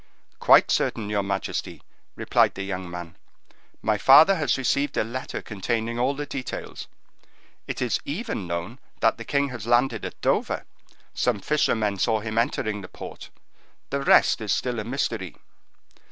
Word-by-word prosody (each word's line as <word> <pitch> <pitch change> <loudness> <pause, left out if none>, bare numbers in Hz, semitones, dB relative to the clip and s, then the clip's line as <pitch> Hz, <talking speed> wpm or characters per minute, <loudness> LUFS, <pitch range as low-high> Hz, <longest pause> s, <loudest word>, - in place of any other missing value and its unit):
"Quite - - +6
certain, 105 -2 0
your 105 -1 +1
majesty," 100 0 -4 0.3
replied - - +2
the 95 - -4
young 95 -2 -4
man; 85 -1 -8 0.7
"my 110 -1 +1
father 155 +8 +8
has 150 -3 +1
received 140 +2 0
a - - +3
letter 120 +4 -5
containing 115 +3 -2
all 130 +3 +1
the 145 +1 -4
details; 135 -3 -6 0.8
it - - -2
is 125 - 0
even 160 - -4
known 85 +9 -4 0.2
that 115 - +3
the - - -5
king 140 +4 0
has 120 -3 -7
landed 120 +3 +2
at - - -6
Dover; - - 0 0.5
some 120 -5 0
fishermen 110 -6 +1
saw 110 +3 +2
him 110 +1 -2
entering 110 -2 -1
the 95 - -9
port; - - -10 0.6
the 140 0 -1
rest 135 - +4
is 105 -2 -2
still 125 +1 -1
a - - -3
mystery." 115 - -3
115 Hz, 155 wpm, -25 LUFS, 100-135 Hz, 0.8 s, father